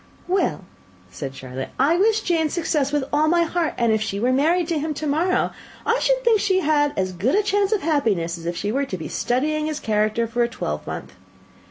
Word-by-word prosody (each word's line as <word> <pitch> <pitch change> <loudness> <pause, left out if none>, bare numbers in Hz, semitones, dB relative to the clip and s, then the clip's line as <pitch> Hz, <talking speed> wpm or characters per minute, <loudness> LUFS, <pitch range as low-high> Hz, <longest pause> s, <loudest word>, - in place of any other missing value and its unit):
"Well," 375 +2 0 0.5
said 135 -2 -6
Charlotte, 130 0 -6
"I 285 +6 +3
wish 435 +4 +3
Jane 330 -5 +1
success 300 -4 0
with 295 -2 +1
all 305 +1 +3
my 340 +1 +4
heart; 335 -1 -1
and 235 -2 +2
if 220 -1 +1
she 200 -2 -2
were 250 +4 +2
married 325 +6 +2
to 325 -3 0
him 305 0 -3
to 310 - -4
morrow, 325 +6 +1 0.3
I 465 +2 +2
should - - +1
think 460 -3 +4
she 380 -2 +2
had 290 -2 +2
as 185 -1 0
good 225 - +1
a 420 - +3
chance 405 -1 +1
of 425 -6 +1
happiness 215 - +1
as 170 -1 -8
if 170 0 -2
she 205 - -2
were 275 +4 0
to 190 - -5
be 160 - -6
studying 305 +5 0
his 305 -1 -3
character 215 +1 +1
for 235 +1 -2
a 235 - +2
twelvemonth. 75 - -5
295 Hz, 220 wpm, -22 LUFS, 220-345 Hz, 0.5 s, my